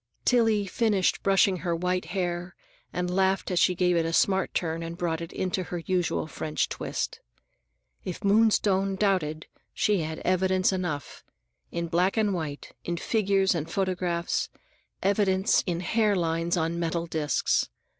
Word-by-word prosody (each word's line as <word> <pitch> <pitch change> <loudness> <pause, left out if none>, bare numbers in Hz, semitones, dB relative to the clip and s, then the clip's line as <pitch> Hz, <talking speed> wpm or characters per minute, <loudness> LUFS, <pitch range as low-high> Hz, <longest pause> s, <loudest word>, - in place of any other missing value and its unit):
Tillie 225 -4 +3
finished 200 -1 +1
brushing 195 -1 +3
her 175 -1 -1
white 180 +2 -1
hair 175 -2 -3 0.4
and 180 0 -2
laughed 190 0 +1
as 180 - +2
she 180 - +3
gave 180 0 +2
it 165 - +2
a 165 - -2
smart 190 +2 +2
turn 165 -1 -1
and 165 0 -6
brought 170 -2 -1
it 170 - -6
into 185 0 -2
her 175 - -4
usual 180 -4 0
French 155 0 -2
twist. - - -4 0.8
If 180 +3 -6
Moonstone 200 -2 +3
doubted, 185 -6 0 0.3
she 210 -2 +2
had 160 0 -3
evidence 185 +1 +2
enough: 175 -6 -4 0.5
in 170 0 -2
black 180 +5 +1
and 210 -2 +2
white, 155 -5 -5
in 170 0 -3
figures 195 0 +2
and 165 -2 -3
photographs, 180 -2 -1 0.5
evidence 195 0 +2
in 175 -1 -1
hair 215 +2 +2
lines 170 0 0
on 165 +1 -1
metal 170 0 -1
disks. 155 -3 0
180 Hz, 150 wpm, -27 LUFS, 170-195 Hz, 0.8 s, Tillie